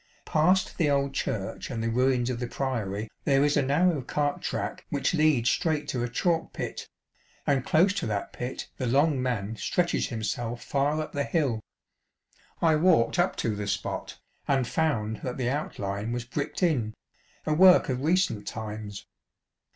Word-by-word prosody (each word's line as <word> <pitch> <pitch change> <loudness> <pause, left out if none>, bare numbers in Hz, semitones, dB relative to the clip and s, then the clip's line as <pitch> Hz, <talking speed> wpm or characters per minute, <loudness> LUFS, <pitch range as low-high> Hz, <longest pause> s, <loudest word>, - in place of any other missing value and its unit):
Past 180 +6 +2
the 155 -4 +3
old 140 -1 +1
church 95 -7 -3
and 115 -4 -3
the - - 0
ruins 125 0 +2
of 120 - -4
the 125 - -2
Priory 115 -6 -2 0.2
there 140 -2 +4
is 145 - +2
a 145 - +4
narrow 150 +3 +2
cart 145 +3 -1
track - - -3
which 140 +3 0
leads 150 -7 +3
straight 155 -4 0
to 125 -2 -1
a 120 - -2
chalk 165 +7 0
pit, - - -5 0.6
and 140 -3 +2
close 170 +8 +4
to 185 - -2
that 105 -2 -3
pit 125 +1 -5
the 130 - -2
Long 140 +2 +3
Man 115 -4 -2
stretches 175 +8 0
himself 115 +1 -3
far 145 +2 0
up 155 - -4
the 140 - -1
hill. 140 -9 0 1.0
I 160 -2 +5
walked 170 -2 +3
up 175 - +2
to 110 -2 0
the 100 0 -4
spot, 100 -1 -3 0.3
and 135 -3 +2
found 115 -10 0
that 125 +3 -5
the 125 -1 0
outline 105 -6 -3
was 120 0 -3
bricked 140 +8 -3
in, 120 -11 +1 0.5
a 155 - +1
work 185 +3 +7
of 130 -1 -1
recent 160 - +1
times. 105 -2 -6
130 Hz, 170 wpm, -27 LUFS, 115-155 Hz, 1.0 s, work